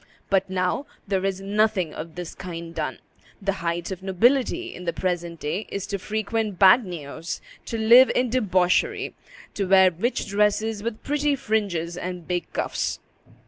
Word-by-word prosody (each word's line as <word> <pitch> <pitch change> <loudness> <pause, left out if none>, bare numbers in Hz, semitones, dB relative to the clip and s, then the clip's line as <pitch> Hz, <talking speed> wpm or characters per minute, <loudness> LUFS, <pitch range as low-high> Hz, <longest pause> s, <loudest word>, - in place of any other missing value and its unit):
But 195 -1 +2
now, 185 +8 -1 0.2
there 190 -1 0
is 195 -1 -1
nothing 200 -4 +1
of 160 +1 -7
this 175 -2 -6
kind 170 -2 -7
done; - - -3 0.4
the 195 -1 0
height 170 +1 -2
of 190 -1 -5
nobility 245 - +2
in 180 - -9
the 170 - -1
present 175 -2 -2
day 165 +8 -3
is 200 -1 -4
to 200 0 -3
frequent 215 0 -2
bagnios, 180 - +3 0.3
to 230 - -3
live 235 +4 +7
in 250 -2 +1
debauchery, 185 -7 +1 0.4
to 200 - -1
wear 190 -1 +6
rich 210 +10 -1
dresses 210 +1 +1
with 225 0 -4
pretty 295 0 +1
fringes 195 -8 -1
and 180 -2 -5
big 175 -1 -2
cuffs. - - -2
195 Hz, 155 wpm, -24 LUFS, 175-220 Hz, 0.4 s, live